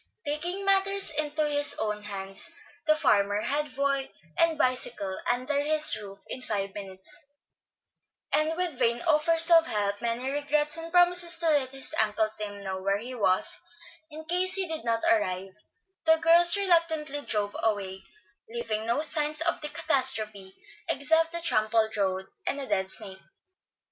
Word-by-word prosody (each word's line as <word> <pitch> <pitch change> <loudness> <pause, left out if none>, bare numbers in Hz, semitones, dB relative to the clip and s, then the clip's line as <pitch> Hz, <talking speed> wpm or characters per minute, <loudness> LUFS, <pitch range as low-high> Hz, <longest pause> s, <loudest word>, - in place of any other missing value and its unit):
Taking 350 +7 -2
matters 390 0 +2
into 305 0 -1
his 290 0 0
own 210 -1 -2
hands, 195 - -2 0.4
the 310 - +5
farmer 205 -7 +2
had 290 0 -2
boy 275 -1 -1 0.2
and 330 -1 +2
bicycle 245 -8 -1 0.2
under 255 +4 -1
his 305 -1 +3
roof 200 -2 -8
in 255 - -6
five 200 -5 -3
minutes; 190 -2 -8 1.2
and 315 +2 +1
with 350 -7 -2
vain 235 +1 +1
offers 330 +1 +3
of 330 -1 +6
help, 205 -1 -1
many 235 +2 -2
regrets, 295 +2 0
and 330 0 -7
promises 355 -1 +4
to 335 -1 0
let 280 -4 +2
his 270 0 -4
Uncle 215 0 0
Tim 205 -1 -6
know 190 -1 -4
where 195 +1 0
he 240 +5 -7
was, 190 -6 +1 0.5
in 315 +1 -9
case 365 +2 +2
he 385 -2 +1
did 320 -1 -5
not 230 -1 -1
arrive, 190 -3 0 0.5
the 320 0 +5
girls 340 +3 +5
reluctantly 325 -6 +1
drove 205 -6 -2
away, 195 -4 -2 0.5
leaving 225 -2 -4
no 260 +6 0
sign 305 -1 +1
of 335 - 0
the 300 - -4
catastrophe 215 -11 +1 0.3
except 320 +4 +2
the 340 0 -4
trampled 220 -5 +1
road, 190 -2 -1 0.2
and 285 - -1
a 275 - -4
dead 190 -6 -1
snake. 190 0 -5
270 Hz, 155 wpm, -27 LUFS, 210-320 Hz, 1.2 s, of